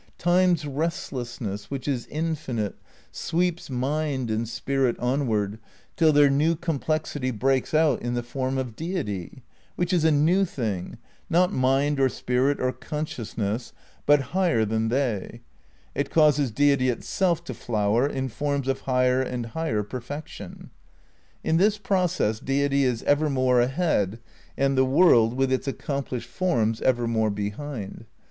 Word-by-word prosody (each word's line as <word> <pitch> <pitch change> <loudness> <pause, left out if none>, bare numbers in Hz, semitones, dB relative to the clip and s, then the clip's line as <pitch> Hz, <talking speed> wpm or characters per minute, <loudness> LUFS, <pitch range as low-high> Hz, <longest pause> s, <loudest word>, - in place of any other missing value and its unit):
Time's 175 -2 +3
restlessness, 130 - -4
which 140 -1 -5
is 130 -4 -1
infinite, 150 - -2 0.4
sweeps 175 -1 -1
mind 135 -1 -1
and 110 +1 -1
spirit 135 +1 0
onward 110 -5 0 0.4
till 160 -2 +4
their 145 -1 +6
new 150 +4 +2
complexity 155 -4 -2
breaks 130 +3 0
out 155 -1 +3
in 120 0 -2
the 120 - -1
form 130 +2 -2
of 125 -4 -3
Deity, 130 - -4 0.3
which 175 0 -1
is 170 -3 +2
a 160 - +5
new 160 +7 +3
thing, 110 - -3 0.3
not 180 +3 +3
mind 135 +3 +2
or 135 -1 +4
spirit 130 +3 0
or 130 - +1
conscious 130 -2 -6
ness, 110 +3 -2 0.3
but 145 -1 +6
higher 175 -12 +2
than 110 +1 0
they; 120 -6 -2 0.5
it - - -2
causes 150 -4 +4
Deity 140 +2 +3
itself 170 +7 0
to - - -6
flower 110 +2 +1
in 135 -2 -2
forms 140 +2 -2
of 135 0 -1
higher 125 0 +3
and 125 -2 -3
higher 115 -4 -2
perfection. 130 +7 -8 0.7
In 160 - +2
this 205 +4 +3
process 180 - 0
Deity 140 +1 +1
is 125 -3 -1
evermore 135 -4 +3
ahead, 125 - 0 0.4
and 135 0 +2
the 130 - +4
world, 130 -5 +5
with 135 0 +1
its 130 +1 0
accomplished 135 -4 -3
forms, 120 -8 0
evermore 115 -3 +1
behind. 105 +2 -5
135 Hz, 140 wpm, -25 LUFS, 120-155 Hz, 0.7 s, their